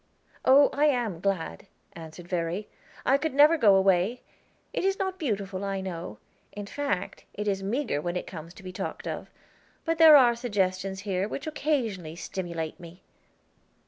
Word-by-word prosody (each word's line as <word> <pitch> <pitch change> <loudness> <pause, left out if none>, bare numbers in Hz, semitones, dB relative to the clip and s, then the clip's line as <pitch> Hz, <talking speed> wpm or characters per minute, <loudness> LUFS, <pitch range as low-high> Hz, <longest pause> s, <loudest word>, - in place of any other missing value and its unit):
"Oh, 275 +2 +6
I 290 +2 +2
am 240 - +1
glad," 175 - -2 0.3
answered 165 +1 -10
Verry. 175 +3 -2 0.4
"I 270 +2 +4
could 315 -2 -2
never 300 +3 +7
go 215 -10 +5
away. 195 +5 +2 0.5
It - - -1
is 390 0 +1
not 380 -1 -3
beautiful, 200 - -2
I 195 -1 -2
know; 170 - -6 0.4
in 205 0 -6
fact, 205 -5 -3
it 210 +1 -4
is 195 -1 0
meager 210 - -1
when 175 +2 -3
it 180 - -3
comes 165 -1 -9
to - - -13
be 185 - -7
talked - - -5
of; - - -5 0.6
but 330 -1 0
there 320 -2 +10
are 240 -3 +5
suggestions 190 -4 -1
here 190 -1 -1
which 275 - -5
occasionally 235 - -2
stimulate 170 -3 -5
me." 170 +1 -13
195 Hz, 165 wpm, -27 LUFS, 180-265 Hz, 0.6 s, there